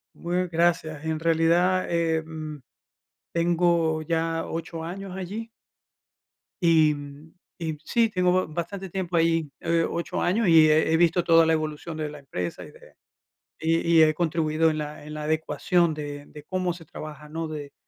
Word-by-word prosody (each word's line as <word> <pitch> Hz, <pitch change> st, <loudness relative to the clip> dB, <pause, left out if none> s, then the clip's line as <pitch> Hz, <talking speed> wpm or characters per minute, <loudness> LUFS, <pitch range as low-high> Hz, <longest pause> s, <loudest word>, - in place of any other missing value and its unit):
Muy 180 Hz, +1 st, -1 dB
gracias. 165 Hz, -2 st, 0 dB
En 160 Hz, 0 st, -2 dB
realidad, 170 Hz, +3 st, +2 dB
em, 160 Hz, -3 st, -2 dB, 0.7 s
tengo 170 Hz, -2 st, +2 dB
ya 165 Hz, 0 st, -1 dB
8 165 Hz, 0 st, -5 dB
años 190 Hz, +2 st, -6 dB
allí 205 Hz, +5 st, -5 dB, 1.1 s
y 160 Hz, -3 st, +5 dB, 0.7 s
y 160 Hz, -2 st, -3 dB
sí, 230 Hz, -1 st, +2 dB
tengo 180 Hz, -4 st, +1 dB
ba 185 Hz, 0 st, +2 dB
bastante 175 Hz, +5 st, -5 dB
tiempo 180 Hz, -1 st, -3 dB
ahí, 165 Hz, -2 st, +2 dB
eh, 165 Hz, 0 st, +1 dB
8 170 Hz, -, -3 dB
años, 205 Hz, +5 st, +1 dB
y 160 Hz, -3 st, +7 dB
he 160 Hz, +1 st, +3 dB
visto 170 Hz, +1 st, +3 dB
toda 165 Hz, -1 st, +6 dB
la 160 Hz, -, +3 dB
evolución 155 Hz, +1 st, -4 dB
de 155 Hz, -1 st, -3 dB
la 150 Hz, -1 st, -10 dB
empresa, 90 Hz, -10 st, -5 dB
y -, -, -12 dB
de -, -, -18 dB, 0.6 s
y 165 Hz, +1 st, +1 dB, 0.2 s
y -, -, +9 dB
he 155 Hz, 0 st, +2 dB
contribuido 160 Hz, -1 st, +1 dB
en 155 Hz, -, -2 dB
la 150 Hz, 0 st, -6 dB
en 150 Hz, 0 st, -8 dB
la 150 Hz, 0 st, -5 dB
adecuación 160 Hz, +2 st, +1 dB
de 145 Hz, -1 st, -6 dB
de 150 Hz, -1 st, -12 dB
cómo 185 Hz, +1 st, -1 dB
se 170 Hz, -2 st, -12 dB
trabaja, 150 Hz, 0 st, -9 dB
¿no? 160 Hz, +1 st, -4 dB
De 150 Hz, -2 st, -7 dB
165 Hz, 160 wpm, -25 LUFS, 155-175 Hz, 1.1 s, y